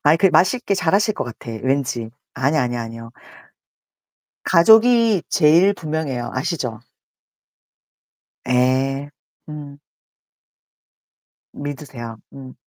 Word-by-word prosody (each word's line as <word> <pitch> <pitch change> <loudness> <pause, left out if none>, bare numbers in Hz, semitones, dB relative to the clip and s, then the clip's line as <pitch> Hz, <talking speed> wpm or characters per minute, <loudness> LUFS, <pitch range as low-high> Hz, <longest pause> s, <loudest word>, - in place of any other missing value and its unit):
아이 150 +2 +4
그 185 +4 +3
맛있게 200 +4 +2
잘하실 195 +4 +1
것 - - -3
같아, 120 -1 -9
왠지. 130 -4 -1 0.2
아니야, 140 +3 +1
아니야, 120 -1 -3
아니에요. 115 0 -9 1.3
가족이 225 +2 +5
제일 170 +6 +4
분명해요. 155 -8 -4
아시죠? 130 -5 -3 1.7
예. 130 +3 +1 0.4
음. 145 -2 -9 1.8
믿으세요. 135 -5 -7 0.2
음. 130 -2 -11
145 Hz, 205 characters per minute, -20 LUFS, 125-170 Hz, 1.8 s, 가족이